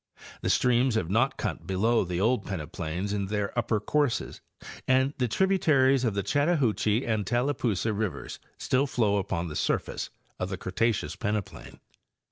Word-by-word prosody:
The -, -, -1 dB
streams 125 Hz, 0 st, +3 dB
have 95 Hz, -6 st, -1 dB
not 120 Hz, +6 st, +2 dB
cut 80 Hz, -, -4 dB
below 110 Hz, +5 st, +2 dB
the 90 Hz, -1 st, -3 dB
old 110 Hz, +2 st, +2 dB
peneplains 90 Hz, +2 st, -4 dB
in 100 Hz, -1 st, -1 dB
their 105 Hz, 0 st, -2 dB
upper 115 Hz, -2 st, +1 dB
courses 140 Hz, +4 st, -1 dB, 0.5 s
and 130 Hz, +2 st, +3 dB
the 125 Hz, -, +2 dB
tributaries 140 Hz, -, +3 dB
of 115 Hz, -5 st, 0 dB
the 100 Hz, -, 0 dB
Chattahoochee 130 Hz, -, +1 dB
and 110 Hz, -2 st, 0 dB
Tallapoosa 120 Hz, -4 st, 0 dB
rivers 105 Hz, -2 st, -4 dB, 0.2 s
still 135 Hz, +3 st, +1 dB
flow 110 Hz, -6 st, +1 dB
upon 90 Hz, -3 st, -2 dB
the 75 Hz, -, -7 dB
surface -, -, -1 dB, 0.3 s
of 90 Hz, -, -2 dB
the 95 Hz, -, -3 dB
Cretaceous 110 Hz, +5 st, -1 dB
peneplain. 105 Hz, -6 st, -4 dB
110 Hz, 150 wpm, -28 LUFS, 100-130 Hz, 0.5 s, streams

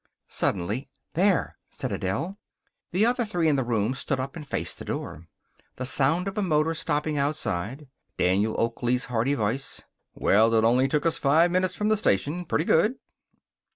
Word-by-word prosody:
Suddenly, 100 Hz, +9 st, -1 dB, 0.2 s
"There!" 185 Hz, +1 st, +1 dB
said -, -, -5 dB
Adele. 165 Hz, -, -3 dB, 0.5 s
The 190 Hz, +5 st, +3 dB
other 245 Hz, +1 st, +2 dB
three 180 Hz, -7 st, 0 dB
in 150 Hz, -, +3 dB
the 135 Hz, -, +1 dB
room 115 Hz, -1 st, 0 dB
stood 135 Hz, 0 st, -2 dB
up 135 Hz, +3 st, -4 dB
and 155 Hz, -4 st, -8 dB
faced -, -, -2 dB
the -, -, -7 dB
door. 80 Hz, +3 st, -5 dB, 0.5 s
The 130 Hz, -, -4 dB
sound 145 Hz, +8 st, +2 dB
of 195 Hz, -, -4 dB
a -, -, +1 dB
motor 160 Hz, -3 st, +2 dB
stopping 150 Hz, -2 st, -1 dB
outside. 140 Hz, -, -2 dB, 0.3 s
Daniel 100 Hz, +4 st, +1 dB
Oakley's 120 Hz, +2 st, 0 dB
hearty 120 Hz, +5 st, +1 dB
voice: 115 Hz, +3 st, -2 dB, 0.3 s
"Well, 110 Hz, +3 st, +4 dB
it 110 Hz, -, +4 dB
only 125 Hz, +4 st, +4 dB
took 150 Hz, +3 st, 0 dB
us 165 Hz, -, +1 dB
five 160 Hz, +5 st, +4 dB
minutes 185 Hz, 0 st, +1 dB
from 210 Hz, 0 st, 0 dB
the 215 Hz, -, +3 dB
station. 160 Hz, -, 0 dB
Pretty 155 Hz, 0 st, 0 dB
good." 210 Hz, +10 st, +3 dB
145 Hz, 170 wpm, -26 LUFS, 115-170 Hz, 0.5 s, Well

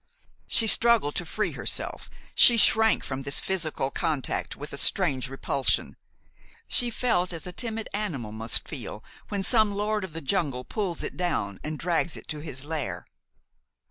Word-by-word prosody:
She 230 Hz, -, +2 dB
struggled 225 Hz, -8 st, +4 dB
to 175 Hz, -, -3 dB
free 215 Hz, +7 st, -1 dB
herself. -, -, -3 dB, 0.2 s
She 240 Hz, -, +7 dB
shrank 220 Hz, 0 st, +6 dB
from 135 Hz, 0 st, -4 dB
this 140 Hz, +1 st, 0 dB
physical 160 Hz, -7 st, -2 dB
contact 155 Hz, -6 st, -2 dB
with 145 Hz, +1 st, -8 dB
a -, -, -5 dB
strange 140 Hz, -9 st, +3 dB
repulsion. 135 Hz, 0 st, 0 dB, 0.7 s
She 245 Hz, -, +4 dB
felt 220 Hz, -7 st, 0 dB
as 165 Hz, -2 st, -7 dB
a 180 Hz, -, -6 dB
timid 225 Hz, +2 st, -4 dB
animal 160 Hz, -, -3 dB
must 110 Hz, +1 st, -2 dB
feel -, -, -6 dB, 0.3 s
when 200 Hz, -2 st, -2 dB
some 215 Hz, -2 st, +3 dB
lord 210 Hz, 0 st, -1 dB
of 185 Hz, -5 st, -7 dB
the 165 Hz, -, -4 dB
jungle 140 Hz, -6 st, -1 dB
pulls 185 Hz, +1 st, -3 dB
it -, -, -4 dB
down 160 Hz, -, -2 dB
and 155 Hz, 0 st, -4 dB
drags 170 Hz, 0 st, -1 dB
it -, -, -12 dB
to 150 Hz, -, -4 dB
his 145 Hz, -3 st, -4 dB
lair. 155 Hz, -4 st, -4 dB
170 Hz, 165 wpm, -26 LUFS, 140-210 Hz, 0.7 s, She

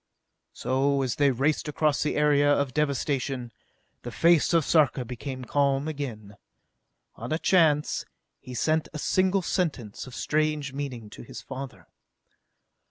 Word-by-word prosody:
So, 135 Hz, +1 st, +1 dB
as 125 Hz, -3 st, -2 dB
they 145 Hz, -1 st, +4 dB
raced 135 Hz, +5 st, 0 dB
across 150 Hz, 0 st, +1 dB
the 150 Hz, -, 0 dB
area 145 Hz, -1 st, +4 dB
of 140 Hz, -2 st, +1 dB
devastation, 135 Hz, -3 st, -1 dB, 0.5 s
the 120 Hz, -, -6 dB
face 165 Hz, +5 st, +3 dB
of 165 Hz, -4 st, +3 dB
Sarka 140 Hz, -5 st, +3 dB
became 130 Hz, +2 st, -6 dB
calm 140 Hz, +1 st, +1 dB
again. 115 Hz, -9 st, -6 dB, 0.8 s
On 115 Hz, +2 st, -6 dB
a 155 Hz, -, +2 dB
chance, 160 Hz, -5 st, +2 dB, 0.4 s
he 125 Hz, -, -9 dB
sent 155 Hz, +5 st, +1 dB
a -, -, -4 dB
single 185 Hz, +4 st, +1 dB
sentence 140 Hz, -, -2 dB
of 125 Hz, -, -10 dB
strange 150 Hz, -2 st, -1 dB
meaning 130 Hz, -7 st, -6 dB
to -, -, -10 dB
his 120 Hz, -, -10 dB
father. 135 Hz, 0 st, -8 dB
140 Hz, 140 wpm, -26 LUFS, 130-155 Hz, 0.8 s, they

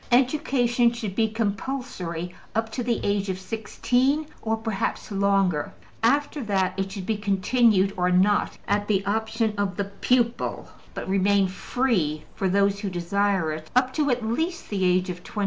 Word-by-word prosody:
Education 245 Hz, -2 st, +3 dB
should 220 Hz, -5 st, -4 dB
be 220 Hz, +2 st, +2 dB
compulsory 205 Hz, -6 st, -3 dB, 0.2 s
up 225 Hz, 0 st, 0 dB
to 250 Hz, -, -3 dB
the 235 Hz, -2 st, 0 dB
age 200 Hz, -1 st, 0 dB
of 185 Hz, -, -1 dB
16, 245 Hz, +8 st, 0 dB, 0.2 s
or 225 Hz, 0 st, 0 dB
perhaps 220 Hz, -1 st, -3 dB
longer; 195 Hz, -5 st, +1 dB, 0.3 s
after 285 Hz, +4 st, +1 dB
that, 190 Hz, -3 st, +1 dB
it 195 Hz, 0 st, -2 dB
should 195 Hz, -1 st, -6 dB
be 220 Hz, +1 st, 0 dB
continued 200 Hz, 0 st, +3 dB
or 180 Hz, 0 st, +1 dB
not 190 Hz, +3 st, +2 dB
at 205 Hz, 0 st, +1 dB
the 195 Hz, -2 st, +1 dB
option 220 Hz, +1 st, 0 dB
of 195 Hz, -3 st, -1 dB
the 200 Hz, -, +1 dB
pupil, 235 Hz, +4 st, 0 dB, 0.3 s
but -, -, -5 dB
remain 195 Hz, +1 st, +3 dB
free 185 Hz, -, -1 dB
(for 190 Hz, -, -1 dB
those 200 Hz, +1 st, +2 dB
who 200 Hz, -1 st, -3 dB
desire 185 Hz, -1 st, 0 dB
it) 155 Hz, 0 st, -6 dB
up 255 Hz, 0 st, +3 dB
to 295 Hz, -1 st, +1 dB
at 245 Hz, -3 st, 0 dB
least 320 Hz, +10 st, -2 dB
the 195 Hz, -2 st, 0 dB
age 180 Hz, +1 st, +2 dB
of 180 Hz, 0 st, -9 dB
21. 210 Hz, -, -7 dB
205 Hz, 165 wpm, -25 LUFS, 190-235 Hz, 0.3 s, Education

